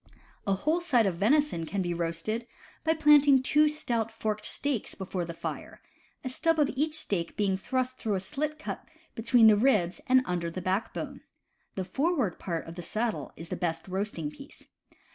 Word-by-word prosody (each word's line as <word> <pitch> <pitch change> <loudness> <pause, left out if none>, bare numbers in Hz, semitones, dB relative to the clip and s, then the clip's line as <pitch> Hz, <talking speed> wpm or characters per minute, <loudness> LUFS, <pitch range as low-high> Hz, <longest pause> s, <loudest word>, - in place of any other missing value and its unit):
A 195 - +3
whole 310 - 0
side 250 -10 +3
of 185 -4 0
venison 245 - +2
can 195 +1 -1
be 175 -1 -1
roasted 170 +8 -2 0.4
by 320 0 +2
planting 290 -3 +6
two 300 +3 +4
stout 235 -7 -1
forked 215 -1 -3
stakes 280 -6 -1
before 185 -2 -3
the 170 - -6
fire, - - -6 0.4
a 255 - -3
stub 325 +5 +1
of 295 -2 +3
each 305 +3 +1
stake 175 - -2
being 200 -2 +2
thrust 255 +5 -2
through 215 -4 -1
a - - 0
slit 300 +8 -3
cut 315 - -6 0.3
between 230 +1 +4
the 215 -1 +8
ribs 205 -7 +2
and 255 0 +5
under 175 -4 -2
the 170 - -5
backbone. 185 +4 -3 0.5
The 190 - -2
forward 270 - 0
part 170 -3 -3
of 165 - -7
the 175 - -7
saddle 220 +6 -2
is 165 0 -10
the - - -2
best 165 -1 -3
roasting 185 -5 -3
piece. 275 - -14
220 Hz, 180 wpm, -29 LUFS, 185-275 Hz, 0.5 s, the